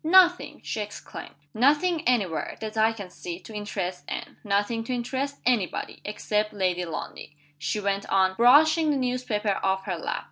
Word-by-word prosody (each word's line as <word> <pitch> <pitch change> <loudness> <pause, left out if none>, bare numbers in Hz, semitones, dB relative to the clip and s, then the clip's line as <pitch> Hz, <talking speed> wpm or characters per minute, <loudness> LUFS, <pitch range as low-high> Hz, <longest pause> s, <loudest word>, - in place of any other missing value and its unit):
"Nothing!" 355 +2 +5
she - - -3
exclaimed. 210 0 -8 0.2
"Nothing 300 +8 +3
any 245 -5 +4
where, 165 -3 -4
that 220 0 -5
I 220 +1 +4
can 200 -5 -8
see, 175 0 -6
to 220 - -11
interest 195 -4 -4
Anne. - - -5
Nothing 205 +3 0
to 255 - -2
interest 265 +3 -2
any 235 -7 +3
body - - -6
except 210 0 -1
Lady 180 -3 0
Lundie," 160 -2 -7 0.2
she 210 - -1
went 200 -1 -1
on, 190 -1 +3
brushing 305 - +6
the 290 - +2
newspaper 245 -6 -1
off 190 0 +1
her - - -3
lap. - - -2
215 Hz, 175 wpm, -26 LUFS, 195-255 Hz, 0.2 s, brushing